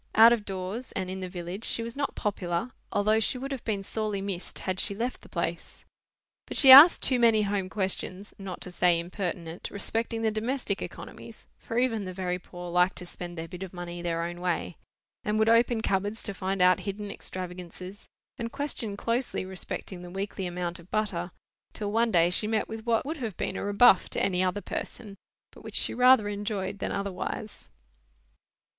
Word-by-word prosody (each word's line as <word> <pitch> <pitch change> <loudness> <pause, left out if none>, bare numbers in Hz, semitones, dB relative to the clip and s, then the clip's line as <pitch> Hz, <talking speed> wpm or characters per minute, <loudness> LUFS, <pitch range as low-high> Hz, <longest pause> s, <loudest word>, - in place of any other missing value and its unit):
Out 230 +2 +9
of 220 -3 -2
doors, 195 +6 -5
and 185 -1 -3
in 190 - -5
the 185 -1 -5
village, 180 +3 -6
she 230 - +2
was 230 0 -6
not 280 0 -2
popular, 190 +1 -2 0.2
although 215 +2 +3
she 225 - +1
would 270 +2 -5
have 270 -3 -4
been 205 -3 -2
sorely 215 0 -2
missed 195 -2 -4
had 185 0 -3
she 200 - +3
left 240 +4 -3
the - - -16
place. - - -4 0.6
But - - -1
she 270 -3 +9
asked 290 +6 +11
too 255 -2 +4
many 225 -2 +5
home 200 -2 -1
questions 190 0 -3
(not 190 -2 -7
to 180 - -8
say 175 -1 +3
impertinent) 175 -1 -5
respecting 225 +2 -2
the 220 - +2
domestic 220 -1 -2
economies - - -9
(for 230 - -5
even 230 -5 +1
the 185 - -5
very 180 -1 -2
poor 175 -1 -9
liked 180 +1 +3
to 180 - -6
spend 175 0 -8
their 165 0 -5
bit 180 +2 -9
of 190 -1 -7
money 175 0 -6
their 170 -1 -1
own 175 +1 -5
way), 180 -1 -2 0.5
and 210 0 0
would 220 0 +3
open 230 0 +4
cupboards 205 +1 -1
to 200 - -3
find 190 -1 -1
out 180 +1 +5
hidden 200 +2 -5
extravagances, 180 +1 -7 0.3
and 230 -1 -3
question 235 -8 -3
closely 235 -2 -1
respecting 185 0 -6
the 180 - -9
weekly 195 0 -4
amount 175 -1 -4
of 170 +1 -16
butter, 190 -5 -1 0.4
till 205 -1 -4
one 230 +2 +2
day 175 -4 +4
she 210 +4 +2
met 220 -1 0
with 225 +1 -8
what 230 +1 +2
would 315 +3 -3
have 225 - -5
been - - -2
a - - -3
rebuff 205 -1 +5
to - - -2
any 185 -2 +1
other 185 +2 -1
person, 205 -1 -6 0.4
but - - -16
which - - -8
she - - +4
rather 250 -3 +6
enjoyed 205 -1 -3
than - - -2
otherwise. 200 +2 -5
200 Hz, 195 wpm, -28 LUFS, 180-225 Hz, 0.6 s, asked